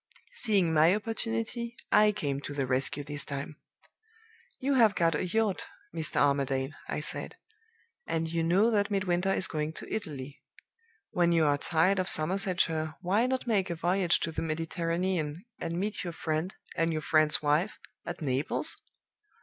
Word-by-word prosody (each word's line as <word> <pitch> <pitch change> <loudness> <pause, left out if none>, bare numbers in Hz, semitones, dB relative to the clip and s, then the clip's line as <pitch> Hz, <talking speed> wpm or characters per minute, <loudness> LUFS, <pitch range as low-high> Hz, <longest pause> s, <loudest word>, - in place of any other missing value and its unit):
"Seeing 195 -8 +1
my 160 +4 +5
opportunity, 230 +2 -3 0.2
I 210 0 +6
came 145 -9 -3
to 145 - -6
the 140 -2 0
rescue 135 +3 0
this 145 0 -5
time. 140 +1 -6 1.0
'You 275 +2 +1
have 225 -6 +5
got 165 -1 +2
a 165 +5 -1
yacht, 215 +1 0 0.3
Mr. 160 -2 -3
Armadale,' 140 0 +1 0.2
I - - -2
said; - - -3 0.7
'and 165 0 -1
you 165 +1 -1
know 190 +8 +3
that 205 -2 +2
Midwinter 190 -2 +1
is 190 - +1
going 155 0 -3
to - - -7
Italy. 145 -9 -5 0.7
When 175 -1 +2
you 165 -2 +4
are 145 -1 +4
tired 175 +6 +2
of 185 - +3
Somersetshire, 165 -2 +1
why 200 +7 +2
not 260 0 -1
make 200 -6 +1
a 170 - -2
voyage 175 +2 +2
to 165 - -1
the - - -3
Mediterranean, 165 +1 -2
and 170 +1 -3
meet 205 +1 -2
your 175 -2 -4
friend, 160 +3 -2 0.2
and 165 0 +1
your 155 -1 -2
friend's 155 -1 +3
wife, 150 +7 +1 0.3
at 175 -1 -6
Naples? 135 +1 0
170 Hz, 160 wpm, -29 LUFS, 155-195 Hz, 1.0 s, I